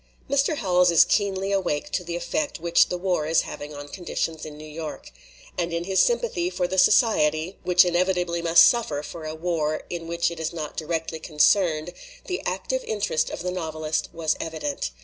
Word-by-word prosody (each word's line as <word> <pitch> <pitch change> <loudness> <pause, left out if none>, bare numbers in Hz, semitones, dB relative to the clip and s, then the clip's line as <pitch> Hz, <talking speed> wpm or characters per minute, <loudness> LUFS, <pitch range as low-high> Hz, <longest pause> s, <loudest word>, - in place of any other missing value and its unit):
Mr. 280 +3 +1
Howells 180 -7 +3
is 170 -2 +6
keenly 195 -1 0
awake 185 -7 -1
to 180 - -1
the 170 0 -5
effect 290 - -2
which 170 +1 +4
the 180 - -2
war 175 -4 -1
is 165 +1 +3
having 145 +1 -7
on 145 -1 -8
conditions 165 -1 -4
in 150 -1 -10
New 155 - -10
York. 155 0 -7 0.5
And 170 0 -1
in 170 0 -2
his 190 +1 0
sympathy 475 -7 +1
for 180 - -1
the 190 +1 0
society 165 - +3
which 180 0 +5
in 175 - 0
evitably 180 -1 +1
must 170 0 +7
suffer 160 -12 0
for 160 +1 -8
a 155 0 -5
war 160 -2 -1
in 170 -1 -5
which 170 0 0
it 170 - -8
is 160 - -3
not 155 -3 -5
directly 160 0 -3
concerned, 160 +1 +2 0.3
the 365 - -3
active - - -2
interest 485 +2 -1
of - - -6
the 180 - -2
novelist 155 -3 -3
was 160 -2 -1
evident. 155 - -3
170 Hz, 190 wpm, -24 LUFS, 155-190 Hz, 0.5 s, must